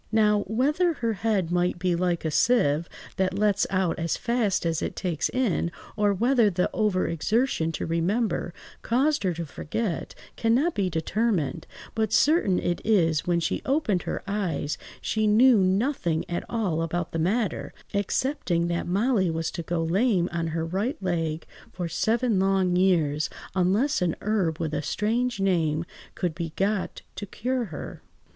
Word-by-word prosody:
Now, 210 -1 +4
whether 295 - +2
her 230 -6 -1
head 200 -4 0
might 175 0 +1
be 180 -1 0
like 175 -1 -1
a 160 - 0
sieve, 165 -6 +2 0.3
that 190 0 0
lets 205 -1 +2
out 185 -3 0
as 165 0 -1
fast 235 -7 0
as 165 -1 0
it - - -3
takes 170 -5 -1
in, 215 -9 0 0.2
or 205 -1 +2
whether 235 +2 +3
the 180 -1 0
over–exertion 200 - +1
to - - -3
remember 175 +4 0 0.3
caused 280 +6 +1
her 185 -3 0
to 170 0 -4
forget, 170 +5 -4 0.2
cannot 250 +9 +2
be 195 -3 0
determined, 180 - -1 0.3
but 220 -2 0
certain 285 - +3
it 175 - -1
is 165 -8 +2
when 175 -1 +2
she 165 - -1
opened 260 - +1
her - - -4
eyes, 190 -7 -2 0.3
she 215 -1 0
knew 230 +2 +6
nothing 190 - +1
at 175 - -3
all 195 -9 -1
about 165 +1 -2
the 165 - -2
matter, 200 +6 0 0.2
excepting 200 - 0
that 170 0 -2
Molly 200 0 +2
was 165 0 -2
to - - -4
go 165 0 -2
lame 185 +1 +2
on 165 -1 -2
her 160 0 -2
right 205 - -2
leg 165 -4 -2 0.3
for 175 -2 -4
seven 220 +5 +1
long 190 -2 +2
years, 160 -5 +2 0.2
unless 190 +10 +2
a 175 -2 +1
herb 190 -7 0
with 160 -2 -2
a 150 - 0
strange 235 - -1
name 165 -4 +1 0.3
could 175 -3 -1
be 165 -1 -5
got 195 0 -1
to 205 - -5
cure 250 +5 -2
her. 160 -8 -8
190 Hz, 160 wpm, -26 LUFS, 170-220 Hz, 0.3 s, knew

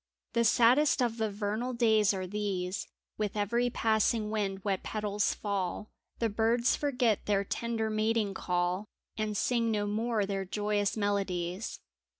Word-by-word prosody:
The 235 0 +3
saddest 250 +6 +4
of 240 -2 +1
the 220 -1 0
vernal 210 +5 -2
days 220 -3 +4
are 190 -2 -3
these 190 -2 -3
— - - -60
With 210 0 -2
every 235 +4 +1
passing 220 -1 +1
wind 195 -3 -2
wet 195 -2 0
petals 210 -1 -1
fall, 200 0 -3 0.3
The 230 - +1
birds 225 +3 +2
forget 250 -7 0
their 200 -1 +2
tender 225 +1 -2
mating 215 -1 +1
call 180 +2 -1 0.3
And 215 -1 -2
sing 235 0 +1
no 210 -2 0
more 215 0 0
their 195 -1 -2
joyous 205 +2 -1
melodies. 195 -2 -2
210 Hz, 150 wpm, -30 LUFS, 200-230 Hz, 0.3 s, saddest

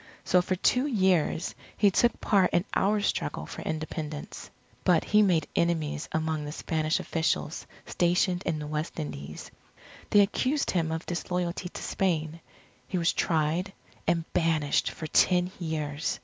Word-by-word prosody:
So 180 - +4
for 185 +1 -1
two 250 +9 +2
years 185 - +1 0.2
he 205 -1 +5
took 240 +5 +2
part 195 -3 +3
in 175 - +2
our 205 +2 +2
struggle - - -1
for - - -8
Independence. 155 -1 -5 0.3
But 175 -3 +4
he 210 0 +4
made 175 -7 +3
enemies 160 -3 0
among 160 -1 -1
the 145 - -5
Spanish 155 0 -1
officials 160 -1 -1 0.2
stationed 180 +1 +1
in 160 - 0
the 150 - -5
West 155 +3 -4
Indies. 75 - -6 0.6
They 205 - +6
accused 255 +8 +1
him 165 -3 0
of 160 +1 -3
disloyalty 180 0 -2
to - - -8
Spain. 165 -4 -1 0.5
He 185 - -2
was 170 0 +2
tried, 165 +4 0 0.3
and 165 -1 +1
banished 160 -4 +2
for 160 - -7
ten 180 +3 +3
years. 155 -3 -2
170 Hz, 150 wpm, -28 LUFS, 155-185 Hz, 0.6 s, They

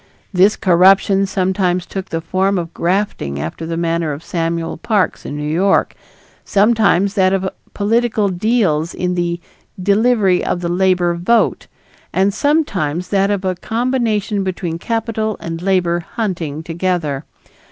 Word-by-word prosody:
This 190 +3 +4
corruption 195 +2 +4
sometimes 185 -1 0
took 190 0 -6
the 165 0 -2
form 190 +4 0
of 170 -1 -4
grafting 170 - -1
after 80 - -5
the 165 0 -3
manner 165 -2 0
of 145 +3 -8
Samuel 165 -1 -2
Parks 200 +1 0
in 145 - -5
New 150 - -4
York; 185 +6 +2 0.5
sometimes 200 -2 +3
that 190 -2 +3
of 190 0 0 0.3
political 215 0 +1
deals 180 -5 0
in 180 0 -1
the 175 -1 -1 0.4
"delivery 200 -1 +2
of 175 - -1
the 170 - -2
labor 180 -1 +2
vote"; 180 +8 +1 0.4
and 195 +1 +2
sometimes 190 - 0
that 195 0 +2
of 200 -2 -1
a 185 - +1
combination 225 -1 -1
between 175 -3 -3
capital 225 0 -2
and 165 0 -5
labor 180 -2 +1
hunting 170 -6 -4
together. 165 -4 -2
185 Hz, 140 wpm, -17 LUFS, 170-205 Hz, 0.5 s, This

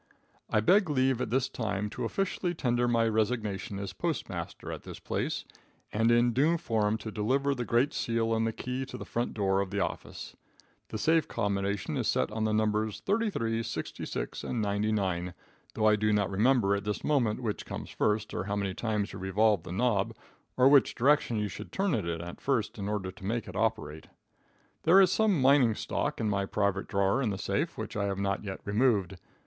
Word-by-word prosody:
I 105 - +2
beg 185 - +4
leave 130 -3 +2
at - - -2
this 130 +2 +1
time 110 -5 -2
to - - -4
officially 185 -2 -1
tender 120 -4 +1
my 115 -1 +3
resignation 110 -1 -1
as 100 -1 -5
postmaster - - -4
at - - -6
this - - -9
place, - - -2 0.5
and 115 +2 +3
in 120 0 +4
due 155 +7 +3
form 110 -6 0
to 110 0 -7
deliver 130 +7 +1
the 125 -3 -3
great 125 +7 +2
seal 115 -1 0
and 115 0 +1
the - - 0
key 125 +3 -4
to - - -7
the - - -7
front 120 +1 -2
door 95 -2 +2
of 100 - -3
the 100 +1 -2
office. - - -4 0.5
The 110 - -5
safe 160 +6 +2
combination 100 0 -1
is - - -1
set - - +1
on 110 0 -1
the 110 - +1
numbers 110 0 0
33, 195 - 0
66 - - -5
and 120 - -2
99, 100 -4 -1 0.4
though 110 - +1
I 105 0 +6
do 105 0 +1
not 100 -2 +1
remember 105 0 +3
at 100 - -3
this 105 0 -3
moment 125 -8 +1
which 105 -3 -2
comes - - -6
first, 105 0 0
or 90 - -2
how 100 0 -2
many 100 -2 -1
times 105 -1 -2
you - - -7
revolve 100 +1 +2
the 85 - -9
knob, 110 +1 +1 0.4
or 130 +1 +6
which 140 -1 +5
direction 135 -2 +3
you 105 -1 0
should 90 - -8
turn 195 -2 0
it 105 -9 0
at 85 +1 -5
first 115 -6 -1
in 100 +1 -3
order 100 -3 -2
to 95 +1 -16
make 115 +4 -2
it - - -8
operate. 110 -9 -2 0.7
There 175 +4 +6
is 190 -2 +6
some 210 -5 +3
mining 130 -4 +5
stock - - -2
in 110 - 0
my 100 -1 0
private 100 -1 0
drawer 100 +5 +1
in 120 - +1
the 100 - -2
safe, - - -2
which - - -5
I 105 -1 0
have 100 -1 -2
not 100 0 -1
yet 95 -2 -6
removed. 100 -4 +1
110 Hz, 200 wpm, -29 LUFS, 100-125 Hz, 0.7 s, I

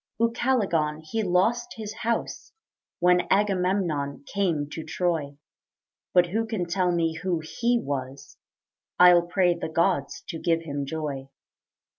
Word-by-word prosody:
Ucalegon 205 -11 +1
he 220 +8 -2
lost 220 +6 +1
his 215 -1 -6
house 235 0 -3 0.4
When 180 0 +3
Agamemnon 180 -8 0
came 170 -5 -1
to 160 - -5
Troy; 160 -6 -2 0.7
But 175 -1 +4
who 225 +4 -1
can 215 -5 -2
tell 180 +1 +1
me 165 -2 0
who 180 -3 0
he 240 +9 0
was 135 - -5 0.6
I'll 180 -1 +8
pray 180 0 +3
the 170 - -5
gods 165 -3 0
to 165 - -4
give 165 0 +1
him 140 -3 -4
joy. 140 -3 -4
175 Hz, 130 wpm, -26 LUFS, 155-200 Hz, 0.7 s, I'll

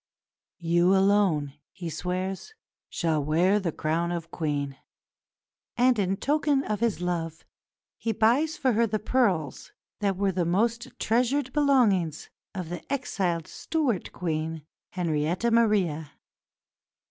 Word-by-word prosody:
"You 175 +2 +3
alone," 190 -8 +2 0.2
he 175 - -7
swears, 185 - -4 0.3
"shall 160 -4 0
wear 175 +7 +3
the 180 -4 -2
crown 165 +3 -1
of 170 -1 -5
Queen"; 145 -4 -2 1.0
and 245 -2 +4
in 195 0 0
token 290 0 +1
of 210 -5 -2
his 230 -5 0
love 165 -2 -3 0.5
he 230 - -1
buys 245 - +2
for 265 -7 +2
her 230 +2 +3
the 215 0 0
pearls 200 - 0 0.3
that 200 -3 0
were 195 0 +1
the 180 -1 0
most 230 +8 0
treasured 250 +4 +1
belongings 225 - +2 0.2
of 180 -4 -4
the 175 - -5
exiled 185 - -1
Stuart 280 - -2
Queen, 160 -2 -3 0.3
Henrietta 175 +5 0
Maria. 195 -10 +2
190 Hz, 125 wpm, -27 LUFS, 165-230 Hz, 1.0 s, and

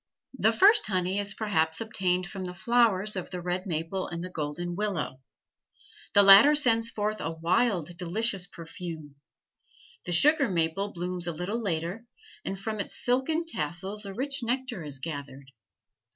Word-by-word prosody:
The 220 -3 +3
first 410 - +5
honey 185 0 0
is 205 0 -2
perhaps 160 -7 +1
obtained 185 -5 0
from 190 +1 -6
the 180 0 -7
flowers 215 -1 +2
of 185 - -5
the 180 - -5
red 180 +2 -3
maple 170 +3 -3
and 170 0 -6
the 185 - -7
golden 170 +3 -4
willow. 180 -10 -3 0.9
The 205 - +8
latter 200 +10 +9
sends 230 -5 +2
forth 215 0 -3
a 155 - -2
wild, 175 +1 0
delicious 190 +1 -1
perfume. 165 -4 -9 0.9
The 180 - -4
sugar 285 - +5
maple 175 +3 -1
blooms 175 0 -4
a - - 0
little 185 +8 -3
later, 180 +4 -3 0.4
and 195 - -4
from 215 +2 -4
its 200 - -4
silken 265 +7 0
tassels 190 - -3
a 195 - -6
rich 275 +3 -2
nectar 240 - -3
is 145 -2 -4
gathered. 140 -2 -7
190 Hz, 155 wpm, -28 LUFS, 170-225 Hz, 0.9 s, latter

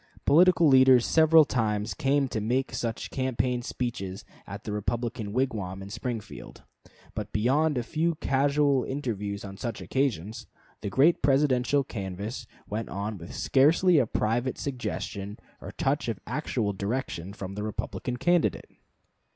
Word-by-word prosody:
Political 170 +2 +5
leaders 130 -3 +6
several 160 -1 +6
times 105 -5 -1
came 140 0 +1
to 110 - -2
make 125 +5 -1 0.4
campaign 130 -1 -1
speeches 115 -7 -4 0.2
at - - -8
the - - -5
Republican 110 0 -3
wigwam 105 -7 -2
in 100 - -9
Springfield. 115 0 -6 0.5
But 105 -1 -5
beyond 140 +7 +2
a 120 - 0
few 165 +6 0
casual 140 -1 +2
interviews 105 -7 -4
on 100 0 -8
such 115 +1 -4
occasions, 115 - -2 0.3
the 100 - -3
great 140 - +4
Presidential 135 0 +3
canvass 105 +2 -6 0.2
went 110 +2 -4
on 100 +1 -4
with 85 - -9
scarcely 160 +5 +4
a 125 - +2
private 120 +5 -1
suggestion 105 - -4 0.2
or - - -7
touch 140 +1 -1
of 110 -5 -3
actual 120 -5 -2
direction 100 -3 -3
from 95 -2 -7
the 105 - -5
Republican 110 +3 -4
candidate. 175 +5 +1
120 Hz, 135 wpm, -27 LUFS, 105-135 Hz, 0.5 s, leaders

